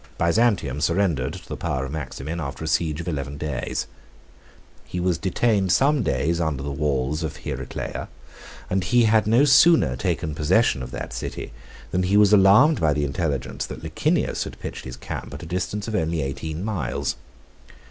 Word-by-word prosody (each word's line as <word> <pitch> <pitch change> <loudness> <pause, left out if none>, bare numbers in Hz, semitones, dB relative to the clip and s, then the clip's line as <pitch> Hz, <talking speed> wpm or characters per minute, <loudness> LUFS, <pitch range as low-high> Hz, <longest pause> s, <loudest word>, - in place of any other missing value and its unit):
Byzantium 85 - +2
surrendered 80 -5 +1
to - - -10
the - - -5
power 65 0 -2
of 65 - -6
Maximin, 80 +2 -5
after 70 0 -5
a - - -3
siege 80 -1 0
of 85 - -9
eleven 70 -3 -3
days. 70 -4 -3 1.0
He 90 - -5
was 90 -1 0
detained 100 0 +1
some 140 +4 +3
days 80 +6 0
under 75 -5 -1
the 70 - -3
walls 70 +1 -1
of 75 -2 -4
Heraclea; - - -5 0.6
and 95 0 0
he 120 +7 +3
had 110 -1 +3
no 120 +6 +5
sooner 140 - +6
taken 75 +4 -2
possession 75 -3 +2
of 60 - -6
that - - -6
city 60 - -5 0.4
than 90 - +1
he 95 +3 +2
was 105 0 +6
alarmed 105 - +6
by 80 -2 +3
the 75 0 0
intelligence 70 0 -2
that - - -8
Licinius - - 0
had - - -9
pitched - - -7
his 65 -1 -7
camp - - -6
at - - -7
the 85 - -8
distance 90 +5 -3
of 110 - -4
only 80 -5 0
eighteen 80 +6 -4
miles. 85 - -2
80 Hz, 180 wpm, -23 LUFS, 70-100 Hz, 1.0 s, sooner